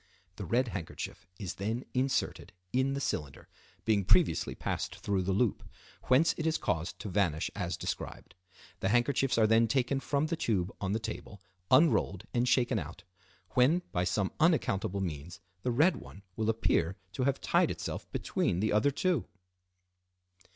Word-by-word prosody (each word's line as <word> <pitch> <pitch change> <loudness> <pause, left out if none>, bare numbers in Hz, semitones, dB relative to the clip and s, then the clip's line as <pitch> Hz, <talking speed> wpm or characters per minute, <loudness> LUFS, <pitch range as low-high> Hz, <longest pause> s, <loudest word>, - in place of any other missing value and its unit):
The 100 - -5
red 120 +7 +1
handkerchief 90 -7 -6
is 95 -2 -4
then 115 +5 -2
inserted 130 +1 -1 0.2
in 130 +2 +2
the - - -2
cylinder, 75 - -3 0.4
being 105 -3 +3
previously - - +3
passed - - -3
through 100 -2 -1
the 95 +1 -1
loop, 105 +4 +1 0.4
whence 135 +6 +4
it 160 - 0
is 160 - +2
caused 80 0 -2
to 105 - -5
vanish 90 -5 0
as - - -2
described. - - -5 0.5
The 95 - 0
handkerchiefs 120 +3 +2
are 110 - +5
then 115 +1 +4
taken 135 +3 +1
from 140 +2 0
the 165 +2 -1
tube 100 - -1
on 95 0 -1
the 110 - 0
table, 105 -2 -7 0.3
unrolled 110 - +4
and 120 +1 +2
shaken 125 -2 +3
out; 85 +2 -8 0.5
when, 150 +8 +3
by 90 - 0
some 95 +2 0
unaccountable 100 - +2
means, 85 +1 -5 0.2
the 125 - -1
red 155 +9 +3
one 100 - -12
will 110 0 0
appear 95 -5 +1 0.2
to 130 - -1
have 140 0 +1
tied - - +2
itself - - -5
between 85 - 0
the 110 +2 +1
other 105 +7 +4
two. 175 - 0
110 Hz, 165 wpm, -31 LUFS, 95-130 Hz, 0.5 s, are